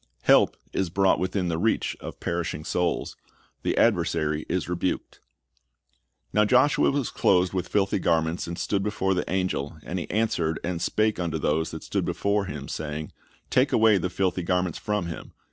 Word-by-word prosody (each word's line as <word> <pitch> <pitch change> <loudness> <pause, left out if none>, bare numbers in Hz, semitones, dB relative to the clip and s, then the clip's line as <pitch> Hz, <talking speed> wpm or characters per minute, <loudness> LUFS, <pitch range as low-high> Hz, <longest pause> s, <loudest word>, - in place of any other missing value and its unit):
Help - - +5 0.2
is 95 -3 0
brought 95 +2 +3
within 95 0 -1
the 80 -1 -1
reach 110 +4 +1
of - - -8
perishing 85 -3 -3
souls. 90 -1 -1 0.5
The - - -1
adversary 75 0 +1
is 90 -1 -1
rebuked. 90 +1 -2 1.1
"Now 105 - +4
Joshua 130 +7 +4
was 140 -3 -1
clothed 90 0 +2
with 90 -2 -2
filthy 100 -1 +1
garments, 80 -1 0
and 85 0 -5
stood 100 - 0
before 95 -2 0
the 90 - -2
angel: 90 -5 -1
and 90 - -3
he - - -6
answered 85 -7 0
and 85 -1 -2
spake 110 -2 +1
unto 85 -2 -1
those 80 +1 0
that 80 -1 -7
stood - - -1
before 100 0 0
him, 70 -6 -6
saying, 75 0 -5 0.4
Take - - +3
away 110 -3 +5
the 90 - -1
filthy 95 0 0
garments 90 -1 0
from 105 -3 -1
him. 85 -1 -7
90 Hz, 170 wpm, -26 LUFS, 80-100 Hz, 1.1 s, Help